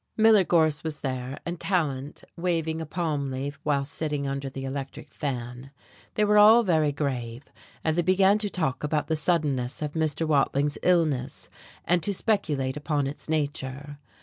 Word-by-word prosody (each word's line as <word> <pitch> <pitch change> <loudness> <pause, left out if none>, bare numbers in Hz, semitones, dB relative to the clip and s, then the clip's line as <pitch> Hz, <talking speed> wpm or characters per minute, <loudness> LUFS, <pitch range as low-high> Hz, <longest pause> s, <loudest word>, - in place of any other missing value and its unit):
Miller 220 -2 +6
Gorse 160 -4 +2
was 155 -2 -4
there, 130 0 -4
and 170 0 -4
Tallant, 150 -6 -2
waving 165 -2 -1
a 160 - -5
palm 150 -4 -2
leaf 140 +2 -5
while 140 -2 0
sitting 150 0 -2
under 135 0 -3
the 135 0 -6
electric 135 +1 -6
fan. 125 -2 -5 0.5
They 210 - +3
were 210 0 +5
all 220 +3 +8
very 160 -7 +2
grave, 130 -4 -3 0.4
and 160 -1 +1
they 175 - +2
began 190 +3 +4
to 210 -1 0
talk 155 -10 -2
about 150 +1 -1
the 160 - +2
suddenness 150 -6 0
of 150 -1 -3
Mr. 160 0 0
Watling's 145 -1 +1
illness 155 -7 0 0.4
and 175 0 +2
to 200 +4 0
speculate 150 - 0
upon 150 -1 -1
its 140 +3 -7
nature. 145 -2 -3
150 Hz, 165 wpm, -26 LUFS, 140-170 Hz, 0.5 s, all